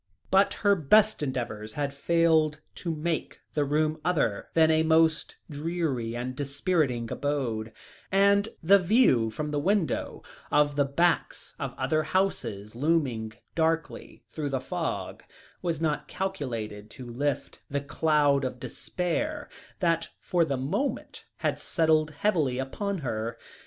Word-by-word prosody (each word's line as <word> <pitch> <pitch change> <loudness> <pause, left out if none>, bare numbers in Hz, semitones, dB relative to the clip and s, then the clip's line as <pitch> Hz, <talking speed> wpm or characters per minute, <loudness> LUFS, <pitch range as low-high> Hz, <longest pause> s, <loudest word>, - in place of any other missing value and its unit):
But 195 +1 +4
her 200 - +7
best 210 +6 +4
endeavours 120 -6 -3
had 145 -1 -2
failed 160 0 +2
to 175 - -6
make 160 +1 -3
the 150 - +1
room 155 +2 0
other 150 - 0
than 160 -1 +5
a 160 0 +4
most 160 0 +3
dreary 145 -7 -2
and 125 +1 -4
dispiriting 140 -4 0
abode, 120 -7 -2 0.4
and 200 +2 +4
the 200 +4 +7
view 180 - +4
from 150 +7 -4
the 145 - 0
window, 185 -2 0 0.3
of 145 0 +3
the 145 -1 +3
backs 170 +5 0
of - - -4
other 155 0 +1
houses 130 - -1
looming 125 -5 0 0.2
darkly 165 0 -1
through 150 -2 -3
the 135 -1 -1
fog, 130 - -4 0.4
was 170 -4 -1
not 150 -2 -1
calculated 115 - -4
to 125 - -10
lift 135 +4 -3
the 140 - -1
cloud 145 -1 +2
of 130 -1 -3
despair 280 - -3 0.3
that 165 -2 +1
for 175 -2 +1
the 140 -4 -1
moment 150 - -3
had - - -1
settled 160 -2 +2
heavily 150 -6 0
upon 195 +10 -2
her. 115 0 -3
150 Hz, 135 wpm, -28 LUFS, 130-170 Hz, 0.4 s, her